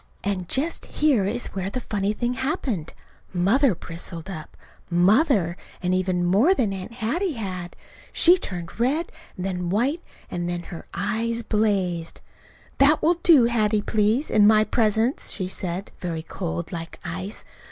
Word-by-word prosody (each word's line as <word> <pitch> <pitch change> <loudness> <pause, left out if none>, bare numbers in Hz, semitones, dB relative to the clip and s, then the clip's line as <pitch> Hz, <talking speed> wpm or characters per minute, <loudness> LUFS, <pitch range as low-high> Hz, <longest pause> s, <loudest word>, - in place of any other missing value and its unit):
And 190 -3 -2
just 310 +5 -1
here 280 -10 +2
is 240 +4 -1
where 190 0 -3
the 255 - -3
funny 205 -4 -1
thing 240 +3 -1
happened. 250 - -2 0.4
Mother 210 +6 +3
bristled 170 +2 -6
up 155 -4 -9 0.3
Mother 185 - +3 0.2
and 180 0 0
even 185 -1 +1
more 215 - +4
than 215 - 0
Aunt 190 +4 -7
Hattie 300 - -1
had. 185 -5 -5 0.4
She 350 +2 +6
turned 175 - -5
red 285 +8 +1 0.3
and 185 - -4
then 180 -2 -2
white, 255 - +1 0.3
and 175 0 -2
her 175 -1 -6
eyes 230 +1 -1
blazed. 195 -7 0 0.6
"That 290 +3 +5
will 335 +2 +3
do, 300 -9 +7
Hattie, 215 -3 +1
please, 220 +8 +1
in 205 -1 +6
my 215 0 +6
presence," 220 +3 +1
she 185 -3 -2
said, 185 0 -3
very 165 -3 -4
cold, 85 - -4
like 165 -1 -6
ice. 185 +4 -5
205 Hz, 150 wpm, -24 LUFS, 180-245 Hz, 0.6 s, do